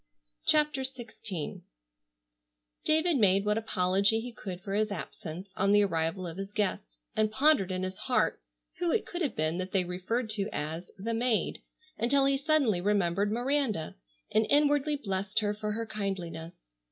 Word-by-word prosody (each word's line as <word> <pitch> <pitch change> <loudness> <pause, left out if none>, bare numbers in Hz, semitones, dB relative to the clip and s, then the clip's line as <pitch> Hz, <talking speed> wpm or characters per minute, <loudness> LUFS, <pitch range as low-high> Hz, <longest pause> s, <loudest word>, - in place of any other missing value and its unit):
CHAPTER 300 -3 +3
XVI 225 - -5 1.2
David 315 0 +3
made 200 -3 +4
what 210 +1 +2
apology 200 0 +2
he 245 +2 -6
could 185 -5 -6
for 195 +1 -5
his 215 +1 +2
absence 180 0 -7
on 195 +1 +3
the 205 0 +6
arrival 170 0 0
of 170 0 -6
his 195 +1 -5
guests, 190 - -2 0.2
and 215 0 +2
pondered 260 -5 +4
in 185 0 -2
his 185 0 -4
heart - - +1 0.4
who 350 -1 +1
it 450 - +1
could 350 - -5
have 285 -9 0
been 155 +3 0
that 185 0 -4
they 190 -2 +3
referred 185 +6 -2
to 205 -1 -1
as 160 +4 -4
"the 225 +4 -3
maid," 230 -1 0 0.4
until 270 +5 +3
he 275 0 +3
suddenly 275 - +2
remembered 200 0 +1
Miranda, 245 - 0 0.4
and 215 0 +3
inwardly 290 0 +3
blessed 200 -5 -3
her 205 -1 0
for 210 0 -3
her 230 +1 -2
kindliness. 185 -6 -4
210 Hz, 165 wpm, -30 LUFS, 185-245 Hz, 1.2 s, the